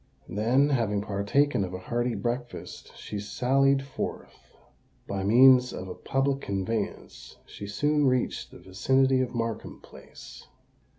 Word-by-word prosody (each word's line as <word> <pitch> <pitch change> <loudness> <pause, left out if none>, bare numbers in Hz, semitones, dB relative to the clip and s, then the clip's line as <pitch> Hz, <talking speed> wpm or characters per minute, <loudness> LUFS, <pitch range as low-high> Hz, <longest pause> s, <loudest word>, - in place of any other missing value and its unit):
Then, 120 +9 +2
having 110 -7 0
partaken 105 +5 +1
of 90 -1 -5
a - - -3
hearty 120 +5 -2
breakfast, 120 0 -5
she 105 - -6
sallied 135 +6 +2
forth. 135 -1 -7 0.5
By 95 -1 -3
means 125 +4 +6
of 95 - -6
a 90 - -6
public 135 +1 -1
conveyance 100 +2 -4
she 100 - -9
soon 145 +7 +1
reached 125 -1 0
the - - -13
vicinity 130 +7 +1
of 125 -1 -3
Markham 115 -1 -4
Place. - - -14
120 Hz, 130 wpm, -27 LUFS, 100-135 Hz, 0.5 s, means